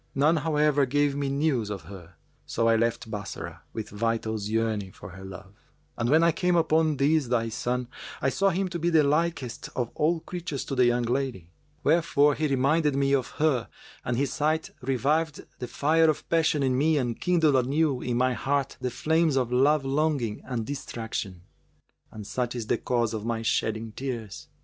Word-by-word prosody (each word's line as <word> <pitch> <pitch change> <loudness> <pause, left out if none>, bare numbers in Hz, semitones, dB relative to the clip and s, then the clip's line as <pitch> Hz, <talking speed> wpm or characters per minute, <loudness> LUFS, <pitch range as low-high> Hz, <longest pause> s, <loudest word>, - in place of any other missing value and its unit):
None, 150 +5 +3
however, 150 -2 +2
gave 145 +1 +1
me 140 -1 -1
news 140 -6 0
of 100 -2 -5
her; 90 -4 -12 0.3
so 115 0 0
I 115 - +5
left 115 0 -1
Bassorah, 105 -2 -6
with 110 -1 -6
vitals 110 -1 -2
yearning 110 -3 -1
for - - -11
her 95 +2 -11
love; 95 0 -10 0.4
and 115 0 -1
when 160 +4 +5
I 170 - +5
came 180 +2 +1
upon 160 -2 +2
this 145 0 +2
thy 115 -1 0
son, 125 +2 -2 0.3
I 135 - +1
saw 195 +8 +2
him 190 +1 0
to 175 -1 -4
be 170 +2 +1
the 160 -3 +5
likest 145 -4 -1
of 120 -2 -2
all 160 +2 +1
creatures 170 -6 -5
to 135 - -4
the 125 -1 +4
young 120 0 +2
lady; 120 -8 -2 0.3
wherefore 150 -2 +3
he 155 +2 0
reminded 140 +2 +2
me 140 0 +2
of 130 -3 +1
her 150 -7 +1 0.3
and 120 -1 -1
his 135 -1 0
sight 155 +1 0
revived 145 +5 0
the 125 - -4
fire 160 +5 +3
of 155 - -2
passion 160 -3 +2
in 130 -1 +2
me 155 +4 +3
and 120 -4 -2
kindled 165 -5 +3
anew 135 +1 +1
in 120 -1 -1
my 130 +1 +2
heart 140 +2 -1
the 125 - -1
flames 160 +4 +1
of 125 -3 0
love 140 +3 +3
longing 135 -6 0
and 120 -4 -3
distraction. 110 -9 -5 0.7
And 110 -1 -9
such 125 +3 -2
is 120 -3 -3
the - - 0
cause 120 -3 0
of 110 -2 -4
my 115 0 -2
shedding 110 0 -1
tears!" 115 -5 -6
135 Hz, 190 wpm, -27 LUFS, 115-155 Hz, 0.7 s, I